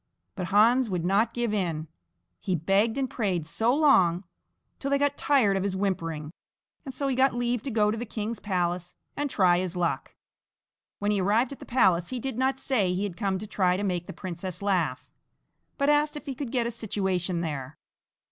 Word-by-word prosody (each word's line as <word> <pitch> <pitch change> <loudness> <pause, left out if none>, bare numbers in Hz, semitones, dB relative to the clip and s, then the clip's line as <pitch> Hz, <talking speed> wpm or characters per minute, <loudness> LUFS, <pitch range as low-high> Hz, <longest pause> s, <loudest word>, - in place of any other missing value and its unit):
But 180 -3 -4
Hans 225 +5 +4
would 175 -3 -2
not 205 +5 +2
give 240 -2 -1
in 165 -6 -1 0.5
he 185 - -1
begged 195 - +1
and 270 -1 0
prayed 190 -10 -1
so 220 +9 +1
long, 210 - +4 0.6
till 275 - -3
they 280 - +3
got 285 0 +1
tired 250 -9 +3
of 195 - 0
his 195 0 -1
whimpering, 165 -6 -2 0.5
and 270 - -6
so 275 +2 -2
he 265 - 0
got 265 0 +3
leave 245 -1 0
to 275 - -5
go 210 -3 +2
to 225 - -3
the - - -3
king's 220 +1 -4
palace 180 -2 -2 0.2
and 290 0 -2
try 180 -6 +3
his 185 -1 -3
luck. 165 -6 -2 0.8
When 205 +1 0
he 205 -2 +1
arrived 220 +7 +2
at 275 - -8
the - - -11
palace 185 -9 +3
he 255 - -3
did 260 -1 -4
not 265 +1 +1
say 225 -9 +1
he 190 - -1
had 200 -4 -3
come 195 -1 -1
to 205 - -6
try 185 -3 +1
to 200 - -3
make 180 -3 -2
the - - -5
princess 185 0 -6
laugh, 160 -11 0 0.7
but 280 - +1
asked 295 +1 +3
if 295 - -9
he 275 - -3
could 260 -2 -5
get 245 -3 +1
a 235 - -1
situation 190 -6 -2
there. 145 -4 -5
205 Hz, 205 wpm, -27 LUFS, 180-245 Hz, 0.8 s, Hans